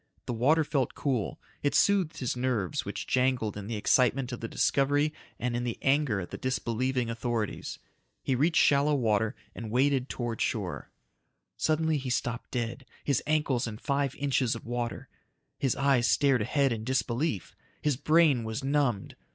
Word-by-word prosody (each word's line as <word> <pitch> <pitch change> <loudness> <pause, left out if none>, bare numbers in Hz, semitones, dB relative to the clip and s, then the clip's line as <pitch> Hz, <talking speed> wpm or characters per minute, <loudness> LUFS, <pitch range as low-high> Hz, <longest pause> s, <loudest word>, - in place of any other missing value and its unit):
The - - -3
water 145 +8 +3
felt 140 -4 -1
cool. 115 - -1 0.2
It 145 - 0
soothed 190 -5 +3
his 125 -2 -2
nerves 125 - -1
which - - -4
jangled 125 -4 +1
in 100 -1 -6
the 115 - -3
excitement 125 +4 +2
of 120 - -5
the 115 - -4
discovery 145 +5 +2 0.2
and 120 0 -2
in 120 - -1
the 120 -2 -3
anger 135 -6 +2
at 90 - -6
the - - -6
disbelieving 125 0 -1
authorities. 115 -2 -3 0.5
He 135 - 0
reached 155 +7 +3
shallow 145 +1 +4
water 110 -4 +1 0.2
and 115 -2 -6
waded 130 +2 +2
towards 120 -3 -3
shore. - - -2 0.7
Suddenly 160 -1 +1
he 130 -1 -5
stopped 125 0 -2
dead, 120 +2 -3 0.2
his 140 -4 +1
ankles 150 -6 +1
in 105 -1 -6
five 140 +1 -1
inches 135 -4 +1
of 115 - -9
water. 120 0 -3 0.5
His 135 -3 +1
eyes 135 -3 +3
stared 135 -4 +3
ahead 135 +4 +2
in 110 -1 -5
disbelief. 125 - -1 0.2
His 150 -3 +1
brain 150 -2 +4
was 110 +4 -4
numbed. 135 -7 0
130 Hz, 165 wpm, -29 LUFS, 115-140 Hz, 0.7 s, shallow